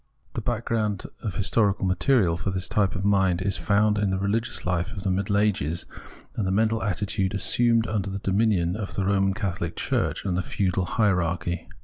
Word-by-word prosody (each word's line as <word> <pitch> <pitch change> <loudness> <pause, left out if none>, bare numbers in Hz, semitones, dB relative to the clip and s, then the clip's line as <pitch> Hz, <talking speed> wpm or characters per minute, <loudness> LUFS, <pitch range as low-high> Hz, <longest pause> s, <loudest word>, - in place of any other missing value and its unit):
The - - -3
background 110 -4 -1 0.2
of 105 -7 -4
historical 100 +1 +1
material 95 0 +2
for 85 - -3
this 95 -1 -2
type 100 -3 +1
of 95 +1 -3
mind 95 -3 +3
is 100 -1 0
found 105 +3 +2
in 105 -1 +1
the 95 - 0
religious 105 +4 -1
life 90 +2 -1
of 100 - -7
the 95 - 0
Middle 100 +2 0
Ages 90 -6 0 0.5
and 105 -4 -1
the - - 0
mental 110 +3 +2
attitude 100 -1 -1
assumed 115 +2 +2
under 100 -3 -2
the 95 - -4
dominion 95 -3 +1
of 105 -2 -5
the 95 - 0
Roman 95 -1 +2
Catholic 90 -6 -3
Church - - -1
and 95 -3 0
the 90 - +1
Peudal 95 +1 -1
Hierarchy. 90 -5 0
100 Hz, 190 wpm, -25 LUFS, 90-105 Hz, 0.5 s, mind